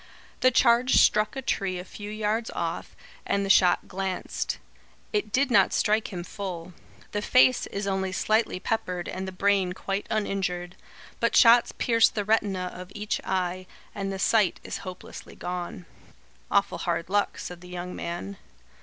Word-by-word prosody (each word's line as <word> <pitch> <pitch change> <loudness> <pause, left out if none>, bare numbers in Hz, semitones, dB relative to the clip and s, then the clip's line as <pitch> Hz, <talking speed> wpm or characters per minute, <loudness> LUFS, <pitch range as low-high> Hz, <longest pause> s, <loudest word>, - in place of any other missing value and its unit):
The 255 - +5
charge 245 0 +4
struck 215 +2 +4
a 270 - -4
tree 190 -5 -1
a 180 - -6
few 205 +1 -8
yards 215 +2 -1
off, - - -4 0.3
and 200 0 0
the 195 - +3
shot 180 -2 +4
glanced. 190 0 -3 0.6
It 210 0 -1
did 275 +2 +2
not - - +5
strike 215 0 +1
him 175 -3 -5
full. 180 -3 -6 0.4
The 205 - -2
face 255 +3 +4
is 200 0 -4
only 190 -1 -1
slightly 215 +1 +1
peppered 180 -4 -2
and 190 +1 -4
the - - -4
brain 190 -1 +1
quite 195 +2 -3
uninjured. 190 -4 -2 0.4
But - - +1
shots 235 -1 +7
pierced 230 -2 +3
the 205 -2 -1
retina 195 -4 +1
of 180 +1 -9
each 210 0 -2
eye, 185 0 -2 0.3
and 195 -1 -3
the 195 - -4
sight 205 -1 +2
is - - -5
hopelessly 185 -1 -9
gone." 180 0 -5 0.6
"Awful 200 0 +1
hard 170 -1 -1
luck," 205 +2 0
said 175 -1 -7
the 180 - -12
young 180 0 -6
man. 175 +3 -5
195 Hz, 165 wpm, -26 LUFS, 180-215 Hz, 0.6 s, shots